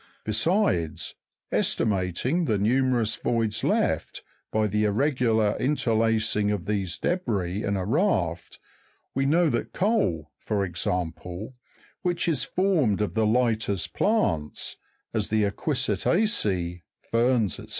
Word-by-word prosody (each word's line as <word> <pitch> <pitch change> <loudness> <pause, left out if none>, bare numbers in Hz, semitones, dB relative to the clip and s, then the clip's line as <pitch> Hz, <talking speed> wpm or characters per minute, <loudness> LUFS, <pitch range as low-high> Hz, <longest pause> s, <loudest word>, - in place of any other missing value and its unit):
Besides, 110 - +1 0.4
estimating 105 - +1
the 110 -8 +1
numerous 120 +1 +1
voids 115 -3 -1
left - - 0 0.3
by 110 0 +2
the 105 +1 +1
irregular 110 -2 +2
interlacing 115 -5 +1
of 105 -4 -2
these 100 -4 -2
debris 105 - -1
in 100 -1 0
a 95 - -2
raft, 100 - 0 0.6
we 135 +1 +1
know 170 +4 +4
that 120 - -2
coal, 95 - 0
for 100 -3 -1
example, 90 +4 -3 0.5
which 175 -1 0
is 150 -8 +1
formed 165 - +1
of 105 -5 -1
the 110 0 +2
lightest 110 -7 +1
plants, 100 - 0 0.4
as - - -1
the 110 0 +2
equisita'ceee, 105 - 0 0.3
ferns, 115 - +2
&c. - - -10
110 Hz, 115 wpm, -26 LUFS, 95-130 Hz, 0.6 s, know